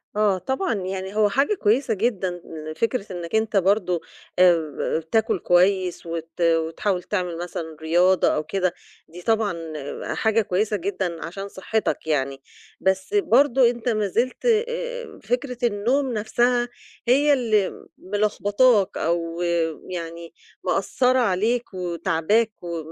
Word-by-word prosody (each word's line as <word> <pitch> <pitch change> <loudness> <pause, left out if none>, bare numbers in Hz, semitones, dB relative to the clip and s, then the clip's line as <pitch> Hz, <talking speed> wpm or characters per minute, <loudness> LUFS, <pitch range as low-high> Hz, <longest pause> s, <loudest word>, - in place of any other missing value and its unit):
آه، 210 -3 +3
طبعًا 265 - -1
يعني 190 0 -4
هو 210 -1 +4
حاجة 275 - +2
كويسة 235 - +2
جدًا 190 -5 -1 0.3
فكرة 230 +3 -1
إنّك 175 +3 -4
أنت 220 -2 +1
برضه 185 -2 +2 0.4
آآ 165 -3 +2
تاكُل 220 -5 +2
كويس 180 0 +2
وت 165 0 -6
وتحاول 165 +3 +1
تعمل 180 -4 -2
مثلًا 165 -2 -6
رياضة 175 +3 +3
أو 155 - +1
كده، 185 -1 -1 0.3
دي 175 +2 -11
طبعًا 220 -1 +1 0.6
حاجة 220 0 +2
كويسة 205 +2 0
جدًا 180 -2 -3
عشان 195 +4 -6
صحّتك 200 -3 -2
يعني. 135 -3 -1 0.4
بس 190 - 0
برضه 270 - +4
أنت 240 0 -3
ما 215 -3 +1
زلت 245 - -1
آآ، 485 +1 -1
فكرة 250 +3 -2
النوم 240 +5 +1
نَفْسها 240 +3 +1 0.4
هي 285 +4 +5
اللي 220 -7 0
ملخبطاك 205 +2 +2
أو 170 +1 -1 0.5
يعني 170 -1 -6 0.3
مأثّرة 255 -2 +2
عليك 225 +2 0
وتاعباك 180 +5 0
و 170 -1 -4
200 Hz, 125 wpm, -23 LUFS, 175-235 Hz, 0.6 s, هي